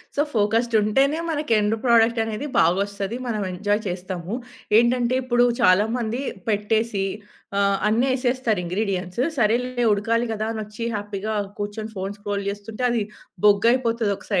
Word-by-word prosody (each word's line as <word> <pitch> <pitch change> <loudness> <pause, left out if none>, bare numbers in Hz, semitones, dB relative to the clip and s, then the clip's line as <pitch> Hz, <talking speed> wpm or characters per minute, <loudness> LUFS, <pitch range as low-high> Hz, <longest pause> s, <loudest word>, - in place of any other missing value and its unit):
So, 290 - +2
focused 225 +2 +1
ఉంటేనే 270 +9 +2
మనకి 300 -5 -2
end 210 +1 +2
product 230 -1 +4
అనేది 225 +5 -4
బాగొస్తది. 200 +5 +1
మనం 215 -3 -1
ఎంజాయ్ 205 +3 0
చేస్తాము. 180 +1 -5 0.4
ఏంటంటే, 240 +1 +3
ఇప్పుడు 240 -1 +3 0.2
చాలా 185 +1 +5
మంది 235 +1 -2 0.3
పెట్టేసి 210 0 0 0.5
ఆహ్, 200 0 +3
అన్ని 230 +4 +2
ఏసేస్తారు 250 -5 0
ఇంగ్రీడియెంట్స్ 185 +2 -2 0.2
సరేలే 245 +2 +1
ఉడకాలి 230 +3 +1
కదా 215 0 -2
అని 220 - -4
వచ్చి 210 +2 -8
హ్యాపీగా 205 +1 -4 0.3
కూర్చొని 210 +2 -4
ఫోన్ 195 +2 -4
స్క్రోల్ 205 -1 -3
చేస్తుంటే, 215 +4 -6
అది 235 -3 +1 0.4
బొగ్గయిపోతది 230 +1 +3
ఒక - - -15
215 Hz, 135 wpm, -23 LUFS, 205-235 Hz, 0.5 s, చాలా